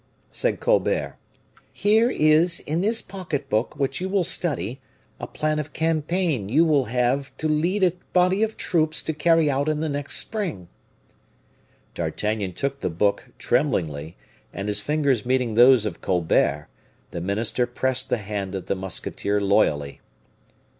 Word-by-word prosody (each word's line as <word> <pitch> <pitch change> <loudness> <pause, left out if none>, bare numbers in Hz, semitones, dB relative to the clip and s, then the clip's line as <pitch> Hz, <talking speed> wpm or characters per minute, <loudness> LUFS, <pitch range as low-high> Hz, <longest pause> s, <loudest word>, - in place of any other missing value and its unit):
said - - 0
Colbert, - - +1 0.6
"here 220 +3 +3
is 160 -1 +3
in 160 +3 -2
this 220 +3 +1
pocket 175 -8 -5
book 110 +7 0
which 135 +2 -1
you 190 - -2
will 195 -1 +1
study, 135 - -1 0.4
a - - -5
plan 155 0 -1
of 150 -1 -6
campaign 160 - 0
you 155 +8 +4
will 145 -5 +2
have 125 +3 0
to 155 - -1
lead 170 +6 +1
a 180 - +5 0.2
body 185 +2 +3
of 220 0 -1
troops 155 -2 0
to 160 - -2
carry 165 +1 +3
out 140 +1 0
in 155 - 0
the 160 +1 -2
next 145 -1 -2
spring." 180 - -4 1.3
D'Artagnan 105 -3 -2
took 140 +7 -3
the - - -2
book, 100 +5 0
tremblingly, 80 - -1 0.3
and 100 - -5
his 105 - +3
fingers 140 -7 +1
meeting 125 -2 0
those 120 0 +6
of 100 -6 -5
Colbert, 80 -5 +1 0.4
the 85 - -5
minister 110 +6 0
pressed 130 +1 0
the - - +1
hand 100 -2 -5
of 95 - -5
the - - -1
musketeer 95 +2 -2
loyally. 90 -9 +1
140 Hz, 155 wpm, -23 LUFS, 105-165 Hz, 1.3 s, those